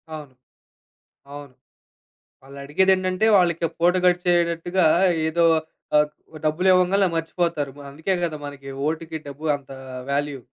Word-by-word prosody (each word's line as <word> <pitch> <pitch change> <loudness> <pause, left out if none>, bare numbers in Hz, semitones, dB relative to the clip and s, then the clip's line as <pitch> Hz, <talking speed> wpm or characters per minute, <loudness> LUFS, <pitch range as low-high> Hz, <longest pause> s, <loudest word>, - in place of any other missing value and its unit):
అవును. 150 -4 -10 1.0
అవును. 145 -2 -10 0.9
వాళ్ళు 140 +1 -13
అడిగేదేంటంటే 185 +5 +2
వాళ్ళకి 170 -2 +1
పూట 175 +2 +4
గడిచేటట్టుగా 175 0 +2 0.4
ఏదో 170 +1 +1 0.5
ఆహ్, 150 0 +4 0.4
డబ్బులివ్వంగానలే 185 +4 +3
ఆహ్, - - -7
మర్చిపోతారు. 165 -3 -2
ఆహ్, 140 - -10
అందుకే 160 +7 -2
కదా! 155 -3 -4
మనకి 140 -1 -9
వోటుకి 160 +1 -3
డబ్బు 140 +3 -9
అంత 140 -1 -12 0.4
వాల్యూ. 145 -1 -2
165 Hz, 115 wpm, -23 LUFS, 145-180 Hz, 1.0 s, పూట